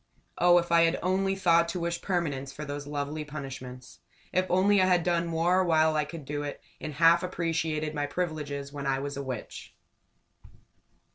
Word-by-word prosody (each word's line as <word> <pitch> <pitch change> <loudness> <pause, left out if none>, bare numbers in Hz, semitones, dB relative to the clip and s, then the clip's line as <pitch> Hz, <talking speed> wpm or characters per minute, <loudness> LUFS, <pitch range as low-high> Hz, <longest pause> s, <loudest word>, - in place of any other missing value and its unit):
Oh, 175 0 +6
if 170 -1 0
I 170 0 +6
had 165 - +1
only 195 +1 +1
thought 170 -3 +3
to 180 - -3
wish 170 0 -2
permanence 145 -8 -2
for 150 +2 -7
those 145 0 -6
lovely 145 +1 -3
punishments! 130 -4 -8 0.3
If 185 0 +2
only 190 +2 +4
I 185 - +4
had 180 -2 +3
done 170 -1 +1
more 170 +3 +2
while 160 -2 +3
I 150 -1 +1
could 150 -1 -9
do 145 +1 -3
it, 145 -1 -5 0.2
had 155 - -5
half 165 +3 +5
appreciated 165 -4 -2
my 145 -1 -2
privileges 145 -4 -4
when 140 -1 -4
I 135 0 +1
was 140 +1 -4
a 140 - -4
Witch! 130 -5 -7
160 Hz, 185 wpm, -28 LUFS, 145-175 Hz, 0.3 s, Oh